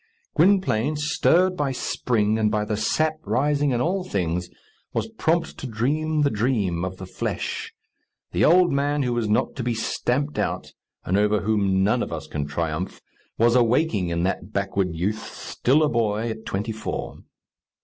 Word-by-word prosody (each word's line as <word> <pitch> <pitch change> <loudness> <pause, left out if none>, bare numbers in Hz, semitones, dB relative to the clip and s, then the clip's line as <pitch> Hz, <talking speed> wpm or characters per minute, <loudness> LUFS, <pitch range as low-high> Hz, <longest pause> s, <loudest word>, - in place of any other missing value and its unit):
Gwynplaine, 155 - +3
stirred 165 +5 +2
by 145 -5 0
spring, 110 -4 0
and 110 -1 +3
by 105 -1 0
the 105 - -1
sap 155 +8 +1
rising 145 +7 +1
in 125 -3 +1
all 185 +5 0
things, 90 - -2 0.4
was - - -1
prompt 170 -6 -1
to 135 - -5
dream 150 +7 0
the 140 - +2
dream 105 -6 0
of 90 0 -4
the 95 - -7
flesh. 90 - -4 0.6
The - - +1
old 180 +2 +5
man 145 +1 +1
who 120 -2 0
is 110 -2 -1
not 105 - +1
to - - -2
be 120 -1 -1
stamped 135 +5 -1
out, - - -2 0.3
and 95 +3 +2
over 105 0 +2
whom 100 -3 +2
none 105 +5 +2
of - - -3
us 80 -1 -5
can 75 -1 -4
triumph, 80 +4 -3 0.4
was 120 +1 +4
awaking 120 - +2
in 85 0 -1
that 95 0 -2
backward 95 -3 -1
youth, 100 +6 -2
still 145 +5 +1
a - - +4
boy 115 -2 0
at 110 0 -8
twenty 105 +4 -2
four. 110 0 -5
110 Hz, 170 wpm, -24 LUFS, 100-145 Hz, 0.6 s, old